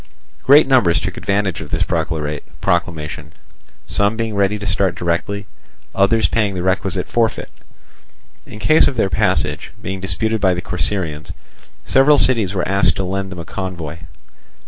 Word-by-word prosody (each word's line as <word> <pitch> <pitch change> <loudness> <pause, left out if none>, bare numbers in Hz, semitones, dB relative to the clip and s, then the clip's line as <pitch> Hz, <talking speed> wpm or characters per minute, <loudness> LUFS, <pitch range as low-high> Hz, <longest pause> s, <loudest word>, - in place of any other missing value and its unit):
Great 145 +3 +6
numbers 120 -11 +3
took - - -4
advantage 100 -2 -1
of - - -8
this - - 0
proclamation, 80 +1 -3 0.5
some 100 +2 0
being 115 -2 -2
ready 100 +1 +1
to 105 - -7
start 95 -1 +1
directly, 90 +4 -2 0.5
others 105 +3 +3
paying 105 -4 0
the 90 - -3
requisite 95 0 -1
forfeit. 115 -1 -1 1.0
In - - -10
case 155 +8 +4
of 140 - -2
their 95 -4 +1
passage 80 - 0
being 95 0 -5
disputed 100 +5 -1
by 95 -2 +3
the 90 - -3
Corcyraeans, 80 -2 -2 0.5
several 140 +2 +5
cities 110 -9 +2
were 90 - -1
asked 100 -1 +2
to 95 - -2
lend 95 +1 -3
them 90 - -7
a 85 - -7
convoy. 85 -4 -6
95 Hz, 150 wpm, -18 LUFS, 85-105 Hz, 1.0 s, Great